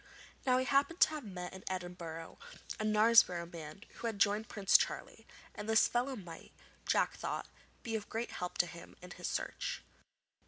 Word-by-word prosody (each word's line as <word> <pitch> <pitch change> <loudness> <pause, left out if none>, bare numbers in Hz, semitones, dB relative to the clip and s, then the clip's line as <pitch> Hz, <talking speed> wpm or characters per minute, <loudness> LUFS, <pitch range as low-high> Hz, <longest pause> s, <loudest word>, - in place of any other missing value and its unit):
Now 255 0 +5
he 260 - +1
happened 280 +5 +2
to - - +8
have 305 -2 -5
met 180 -4 -6
in 190 - -10
Edinburgh 175 -3 -6 0.4
a - - -1
Knaresborough 215 -5 +5
man 160 +3 -8
who 235 - -3
had 220 -3 -3
joined 205 +2 +2
Prince 195 -2 +1
Charlie, - - +2 0.3
and 210 +1 -6
this 220 0 +6
fellow 250 +3 0
might, 175 -7 -10 0.4
Jack - - +3
thought, - - -3 0.4
be 225 -1 -2
of 215 -1 -4
great 230 +2 -3
help 180 0 -4
to 175 - +4
him 170 0 -11
in 180 - -10
his - - -5
search. - - -3
205 Hz, 180 wpm, -34 LUFS, 175-230 Hz, 0.4 s, to